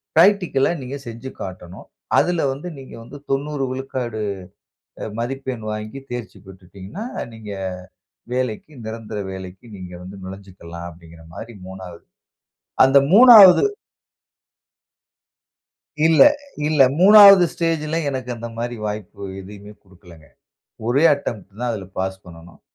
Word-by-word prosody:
பிராக்டிகல்லா 175 -5 +3
நீங்க 130 +2 -6
செஞ்சு 115 +3 -8
காட்டணும். 95 -1 -9 0.3
அதில 175 -2 +2
வந்து 140 +6 -7
நீங்க 135 - -12
வந்து 130 +5 -11
90% 140 +1 -2
விழுக்காடு 130 -4 -5 0.8
அ - - -4
மதிப்பெண் 130 -1 -4
வாங்கி 110 +5 -6
தேர்ச்சி 120 -2 -7
பெற்றுட்டீங்கனா, 95 - -10 0.3
நீங்க 110 -2 -10 0.8
வேலைக்கு 125 +2 -3
நிரந்தர 110 -1 -6
வேலைக்கு 95 +2 -10
நீங்க 90 -1 -10
வந்து 95 +2 -10
நுழஞ்சுக்கலாம். 95 -3 -10
அப்படிங்கிற 85 -1 -16
மாரி, 115 0 -9
3வது. 95 -2 -11 0.8
அந்த 135 +1 +4 0.2
3வது 220 - +9 2.4
இல்ல, 160 -1 +6 0.5
இல்ல. 155 -2 0 0.2
3வது 200 -1 +9
ஸ்டேஜ்ல 160 -2 -2
எனக்கு 130 -2 -5
அந்த 115 +1 -7
மாரி 120 +1 -4
வாய்ப்பு 105 -2 -7 0.2
எதுவுமே 100 +2 -12
குடுக்கலங்க. 90 -4 -18 0.6
ஒரே 135 +6 +2
அட்டம்ப்ட்தான், 115 -3 -6
அதில 100 -4 -6
பாஸ் 95 0 -3
பண்ணணும். 85 0 -14
115 Hz, 110 wpm, -20 LUFS, 95-140 Hz, 2.4 s, 3வது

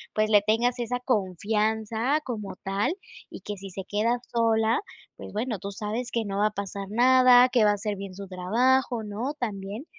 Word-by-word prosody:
pues, 215 0 +1
le 205 - +6
tengas 235 +4 +1
esa 245 +1 -2
confianza 220 - 0
como 215 -7 -5
tal 195 - 0 0.4
y - - -10
que 205 - -5
si 195 +1 -9
se 190 +1 -7
queda 225 +4 +1 0.2
sola, 225 - +2 0.4
pues, - - -9
bueno, 220 -1 -3
tú 200 - -6
sabes 215 +5 -4
que 230 -2 -1
no 200 0 -3
va 210 - +4
a 215 - -3
pasar 200 -1 -5
nada, 250 +2 +6
que 250 -3 +3
va - - +5
a - - +2
hacer 205 0 -4
bien 195 -1 -7
su 200 0 -8
trabajo, 230 +6 +1
¿no?, 225 +8 -4
también. 205 +2 -5
220 Hz, 190 wpm, -26 LUFS, 200-245 Hz, 0.4 s, le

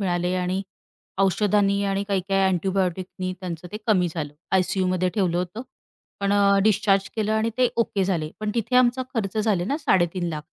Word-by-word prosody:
मिळाले 180 -1 0
आणि 185 +1 -1 0.6
औषधांनी 200 +1 +2
आणि 195 0 0
काही-काही 195 0 +1
अँटिबायोटिकनी 185 0 -1
त्यांचं 180 -2 -6
ते - - -3
कमी 185 -6 +3
झालं, 150 -4 -4 0.2
आय-सी-यूमध्ये 185 -1 +1
ठेवलं 185 -5 +1
होतं. 180 +6 -4 0.6
पण 200 0 +1
अ, 200 -1 +4
डिस्चार्ज 200 -2 +2
केलं 215 -1 0
आणि 220 +1 +1
ते 250 -1 +4
ओके 210 -4 +1
झाले. 165 -5 -1
पण 215 -1 -1
तिथे 240 +2 0
आमचा 250 +1 +4
खर्च 215 -3 -2
झाले 210 -5 +1
ना, 275 +9 -1
3,50,000 175 - 0
195 Hz, 160 wpm, -24 LUFS, 180-210 Hz, 0.6 s, अ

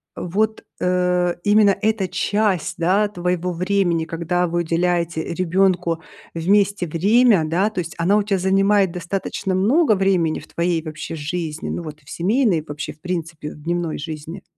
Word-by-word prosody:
вот, 210 +5 -1 0.2
э, 180 -1 +1
именно 205 -1 +5
эта 215 -3 +1
часть, 205 -3 0
да, 195 +5 +2
твоего 180 -2 -2
времени, 175 -2 0
когда 170 +2 -1
вы 175 +1 -1
уделяете 170 -1 0
ребенку 180 -1 +1 0.3
вместе 195 +2 +2
время, 200 +3 +4
да, 175 +7 +1
то 215 - -5
есть 165 -2 -5
она 175 +4 +2
у 210 - +2
тя 200 -2 0
занимает 195 +1 +3
достаточно 185 +2 -3
много 225 - +3
времени 185 -5 +1
в - - -14
твоей 170 -1 -1
вообще 155 0 -6
жизни, 160 0 -4
ну 175 - -4
вот 155 -1 -8
в 145 - -18
семейной 205 0 +1
и 155 - -10
вообще, 145 +1 -5
в 150 - -30
принципе, 165 -4 -4
в 150 - -13
дневной 170 0 -2
жизни? 160 +4 -7
180 Hz, 160 wpm, -21 LUFS, 165-195 Hz, 0.3 s, именно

